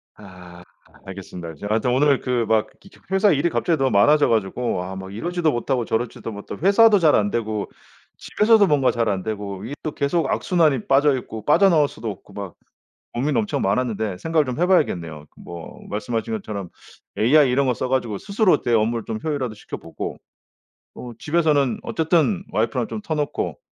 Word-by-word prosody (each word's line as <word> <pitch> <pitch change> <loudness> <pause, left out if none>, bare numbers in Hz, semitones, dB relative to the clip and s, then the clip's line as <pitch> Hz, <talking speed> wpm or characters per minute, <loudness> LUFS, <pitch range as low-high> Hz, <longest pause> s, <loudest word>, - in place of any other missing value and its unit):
아 90 -3 -13 0.4
알겠습니다. 90 -4 -8
제가 100 +8 -2
아무튼 120 +3 0
오늘 140 +2 +3
그 125 -2 0
막 110 -1 +2
그 195 - -20 0.2
회사 195 +2 +4
일이 155 +3 +2
갑자기 165 -1 0
너무 135 -2 +1
많아져 145 +9 +4
가지고 110 -2 -1
아 95 +1 -7
막 95 0 -8
이러지도 170 - -1
못하고 120 -1 -1
저러지도 115 0 -3
못하고 100 - -7
회사도 205 +1 +6
잘 155 -3 +4
안되고 105 0 -1 0.5
집에서도 215 -1 +3
뭔가 145 -5 +3
잘 115 -1 -1
안되고 100 0 -4
이게 135 +5 -6
또 155 - -2
계속 145 +2 0
악순환이 155 - +1
빠져있고 135 -6 +1
빠져나올 160 -2 +4
수도 110 -3 -7
없고 100 +1 -14
막 100 -3 -7 0.6
고민 135 +2 0
엄청 110 -2 -1
많았는데 105 -2 -1
생각을 160 - +1
좀 130 +3 -4
해 175 - +3
봐야겠네요. 85 - 0
뭐 85 -1 -10
말씀하신 110 +1 -3
것처럼 100 -3 -5 0.5
AI 135 +4 +4
이런 135 +2 +2
거 125 - +1
써가지고 120 -3 -1
스스로 200 - +2
네. 120 - -1
업무를 115 +1 +1
좀 110 -1 -3
효율화도 140 -7 -2
시켜보고 105 - -7 0.8
뭐 120 -1 -8
집에서는 150 -4 +1
어쨌든 170 +4 +1
와이프랑 115 +2 0
좀 215 - -5
터놓고 150 -6 -3
125 Hz, 385 characters per minute, -22 LUFS, 105-150 Hz, 0.8 s, 회사도